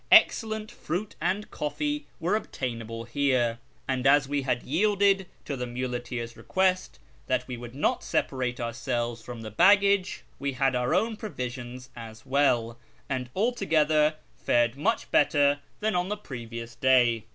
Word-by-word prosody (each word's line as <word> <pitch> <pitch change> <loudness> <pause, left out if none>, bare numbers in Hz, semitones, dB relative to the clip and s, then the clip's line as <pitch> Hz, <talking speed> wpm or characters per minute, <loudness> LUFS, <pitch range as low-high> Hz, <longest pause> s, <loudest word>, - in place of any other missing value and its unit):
Excellent 220 -1 +5
fruit 195 -1 -4
and 205 +3 -1
coffee 295 - -2
were 180 +5 +1
obtainable 115 - -4
here; 120 -2 +1 0.3
and 130 0 0
as 140 0 +5
we 145 0 0
had 125 -2 -1
yielded 195 +4 +2 0.2
to 140 - -3
the 125 -1 -4
muleteers' 120 -1 -4
request 185 - 0 0.3
that - - 0
we 125 - -4
would 120 +1 -9
not 145 - 0
separate 125 -2 -1
ourselves 120 0 -2
from 120 0 -8
the 110 -1 -7
baggage, 200 - +4 0.2
we 140 0 -2
had 130 0 +1
our 125 +6 +1
own 220 +4 +1
provisions 125 - -6
as 115 0 -10
well, 120 -4 +2 0.3
and 130 -2 -2
altogether 155 -9 +2 0.2
fared 120 0 +2
much 215 +11 -1
better 145 -1 +4 0.2
than 215 -1 +1
on 180 +1 0
tlie 210 0 -4
previous 115 -2 -7
day. 120 -2 +3
135 Hz, 145 wpm, -27 LUFS, 120-185 Hz, 0.3 s, Excellent